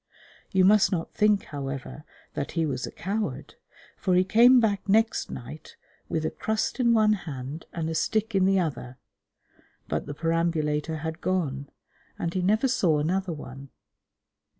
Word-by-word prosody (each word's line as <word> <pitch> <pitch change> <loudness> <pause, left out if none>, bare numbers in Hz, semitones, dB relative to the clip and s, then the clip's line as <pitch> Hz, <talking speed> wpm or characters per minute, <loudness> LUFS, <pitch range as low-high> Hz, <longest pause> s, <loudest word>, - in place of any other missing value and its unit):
You 190 -2 +3
must 210 +1 +5
not 170 -4 -3
think, 210 -2 +3
however, 140 0 -6 0.3
that 140 - -4
he 165 -2 +1
was 130 -4 -3
a - - -8
coward, 200 -6 -4 0.4
for 185 - 0
he 180 - +5
came 240 +6 +6
back 205 -3 0
next 225 +3 +2
night 130 +5 -9 0.3
with 160 -1 -1
a - - -1
crust 220 +4 -2
in 240 -2 +4
one 215 -2 +4
hand 150 -5 -6
and 165 -2 -3
a 160 - -2
stick 215 +6 0
in 190 -1 +3
the 195 0 +3
other, 130 -7 -4 0.9
but 75 - -3
the 145 - -5
perambulator 160 -1 -1
had 160 0 -5
gone, 145 -7 -2 0.5
and 170 - -3
he 185 - 0
never 215 +8 +2
saw 180 -11 +2
another 180 +5 -1
one. 135 -3 -9
170 Hz, 160 wpm, -26 LUFS, 150-205 Hz, 0.9 s, came